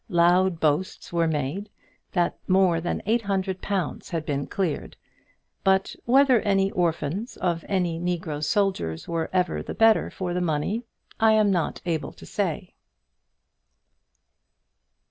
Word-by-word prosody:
Loud 175 0 +3
boasts 160 +4 -1
were 170 -1 +2
made 160 +7 -2 0.4
that 175 -2 +1
more 185 -3 +3
than 175 - -3
eight 225 +3 +2
hundred 190 -2 -2
pounds 195 -3 -3
had 165 -3 -3
been 140 -1 -2
cleared; 180 -6 -3 0.7
but 190 0 +2
whether 260 0 +5
any 195 -2 +1
orphans 175 - -1
of 170 -3 -1
any 175 -4 0
negro 170 -4 -2
soldiers 155 - 0
were 165 -1 -2
ever 180 -2 0
the - - -6
better 225 -1 +4
for 180 -2 -4
the 180 - -1
money 175 +8 -1 0.3
I 220 0 +5
am 215 -2 +4
not 175 -4 -1
able 165 -3 -2
to - - -13
say. - - -3
180 Hz, 135 wpm, -25 LUFS, 165-195 Hz, 0.7 s, whether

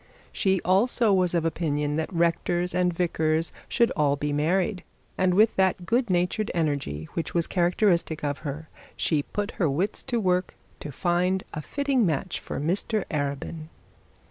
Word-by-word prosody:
She, 190 -1 +1
also, 210 +3 +3
was 180 -2 +2
of 165 -1 +1
opinion, 150 -3 -1
that 160 - -2
rectors 175 +1 0
and 180 0 +2
vicars 165 -2 0 0.2
should 235 -2 +2
all 145 -4 +2
be 145 0 -2
married, 180 +6 0 0.3
and 185 -1 +2
with 215 +3 +4
that 190 -2 +2
good 235 +3 +1
natured 180 +4 0
energy 140 - -1
which 165 0 -4
was 170 -1 +3
characteristic 175 -3 +1
of 145 -1 -2
her, 150 +1 -6 0.3
she 155 -3 +1
put 205 +7 -4
her 165 - +3
wits 180 +10 0
to 240 - 0
work 180 -2 0 0.2
to 150 - -7
find 180 +4 0
a 155 - -4
fitting 280 - 0
match 160 -8 -1
for - - -5
Mr 190 +6 -1
Arabin. 145 +2 -3
175 Hz, 160 wpm, -26 LUFS, 155-190 Hz, 0.3 s, with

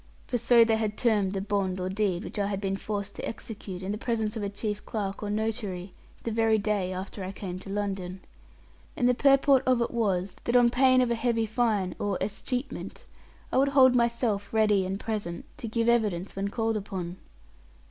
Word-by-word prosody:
For 245 - -1
so 235 0 +6
they 225 -1 +2
had 215 -1 -2
termed 210 -5 +2
the 195 - -2
bond 195 -2 -1
or 180 - -2
deed 190 -2 0
which - - -6
I 200 - +1
had 200 -1 -2
been 195 -1 -1
forced 200 0 -4
to - - -6
execute, 205 -5 -7
in 190 - -2
the 210 - -3
presence 225 -2 -1
of 220 - -3
a 200 - -2
chief 210 +1 -4
clerk 200 -3 -4
or 210 - -3
notary, 210 -4 -2 0.3
the 230 - -2
very 225 0 +3
day 205 -3 0
after 190 +2 -5
I 185 - -4
came 185 -2 -6
to 195 - -10
London. 195 -2 -3 0.8
And 245 - +3
the 250 - +5
purport 275 +1 +5
of 255 -2 +4
it 235 - 0
was, 195 -5 0
that 240 - +1
on 240 -1 +6
pain 255 0 +5
of 245 -1 +1
a - - +4
heavy 230 -1 +1
fine 215 -5 0
or 200 -2 -1
escheatment, 245 +6 -4 0.5
I - - +1
would 275 - +4
hold 260 -1 +8
myself 235 -4 +1
ready 210 -4 +3
and 195 +1 -3
present, 205 -7 -4
to 230 - -5
give 230 +1 0
evidence 210 -6 +1
when 195 +1 -1
called 225 +1 0
upon. 185 -3 -5
210 Hz, 205 wpm, -28 LUFS, 195-230 Hz, 0.8 s, hold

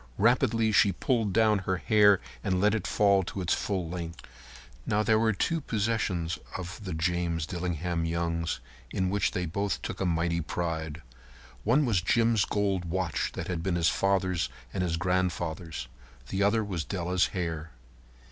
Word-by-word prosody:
Rapidly 115 0 +3
she 100 -1 +5
pulled 115 +1 0
down 110 0 +4
her 95 -1 -1
hair 105 -1 +5 0.2
and 95 -3 +1
let 105 +2 +3
it 110 - -1
fall 100 -2 +4
to 95 +2 -5
its 90 -2 +1
full 95 -5 -1
length. 85 -2 -6 0.6
Now, 105 +1 +1
there 110 0 +3
were 110 0 +3
two 165 - 0
possessions 100 -8 -1 0.2
of 95 +3 -7
the 95 -3 -4
James 85 -1 0
Dillingham 85 -1 -2
Youngs 85 -1 -1 0.3
in 95 -1 -1
which 100 -1 +2
they 90 - -2
both 100 +5 -1
took - - -5
a - - +1
mighty 85 0 +1
pride. 80 -1 -3 0.6
One 135 +7 +3
was 105 -7 +2
Jim's 115 +2 +3
gold 100 -3 0
watch 85 -2 -1
that - - -5
had 90 -3 -2
been 90 0 0
his 85 -1 +3
father's 95 -3 +1 0.2
and - - -1
his 85 -2 0
grandfather's. 85 -5 -1 0.4
The 95 - -1
other 105 +2 +3
was 90 -6 -3
Della's 90 +1 0
hair. 80 -4 -3
95 Hz, 165 wpm, -28 LUFS, 85-105 Hz, 0.6 s, she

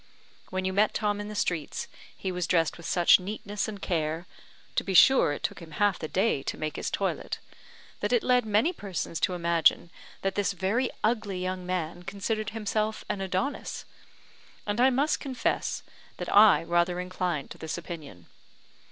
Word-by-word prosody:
When 185 0 -2
you 190 - 0
met 210 +2 +3
Tom 205 -1 0
in 205 - -6
the 210 - -7
streets, 170 -7 -2 0.3
he 190 - -3
was 180 -2 -2
dressed 165 -3 +2
with 170 - -8
such 175 0 +6
neatness 205 +1 -4
and 210 -2 -6
care 165 -2 -1 0.5
(to - - +1
be 190 - -2
sure 265 - +7
it 145 - -5
took - - -2
him 165 -2 -11
half 205 +3 +2
the 155 - -4
day 190 -4 +1
to - - -4
make 155 -1 -3
his - - -2
toilet), - - -2 0.6
that - - -1
it 475 -5 +3
led 250 -1 +4
many 220 - +2
persons 185 - -4
to 185 - +1
imagine 170 -1 +2 0.3
that 195 - 0
this 205 -1 0
very 205 +7 0
ugly 215 -4 0
young 185 0 -3
man 175 -1 -2
considered 205 +3 -3
himself 215 0 -2
an 195 - -2
Adonis; 190 +8 -2 0.8
and 205 +3 0
I 260 - +7
must 280 +4 +1
confess 265 -3 -2 0.3
that - - -3
I 205 -4 +7
rather 175 +1 +1
inclined 180 -5 -2
to - - -9
this 160 +1 -4
opinion. 155 - -8
190 Hz, 180 wpm, -28 LUFS, 170-210 Hz, 0.8 s, sure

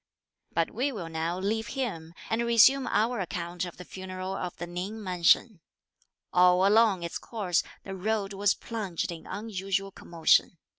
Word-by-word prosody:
But 165 0 0
we 260 +6 -1
will 185 -9 -6
now 165 +2 -2
leave 215 +4 -1
him 170 -11 -4 0.2
and 225 +1 +1
resume 235 +3 +5
our 225 +3 +1
account 175 -1 -3
of 175 - -9
the 180 - -9
funeral 185 +1 -6
of 180 -2 -5
the - - -4
Ning 185 +5 -5
mansion. 185 +3 +3 0.7
All 180 +1 +5
along 210 -4 +4
its 170 - -4
course 200 -7 -1 0.2
the 195 - -6
road 200 +1 -1
was 200 +1 +2
plunged 200 -8 -4
in 165 -1 -9
unusual 195 -1 -3
commotion. 170 0 +2
190 Hz, 155 wpm, -28 LUFS, 175-220 Hz, 0.7 s, resume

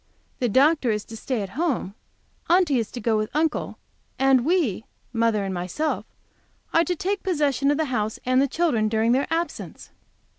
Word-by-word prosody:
The 245 -3 +1
Dr. 275 +3 +3
is 210 -2 -1
to 225 - -10
stay 225 0 -2
at 195 - -6
home, 265 - -2 0.6
Aunty 340 -7 +4
is 225 - -3
to 245 - -7
go 225 0 +1
with 215 0 -1
Uncle, 315 0 0 0.4
and 265 -2 +4
we 300 - +1 0.3
mother 225 -3 +1
and 195 -1 -3
myself 185 - -2 0.7
are 330 - +5
to 355 +2 -1
take 390 +4 -2
possession 290 -6 +1
of 290 - +2
the 315 - +1
house 215 -1 -1
and 255 +2 +3
children 245 -11 +1
during 220 +1 +2
their 265 +3 +2
absence! 335 +1 -4
260 Hz, 175 wpm, -24 LUFS, 220-315 Hz, 0.7 s, are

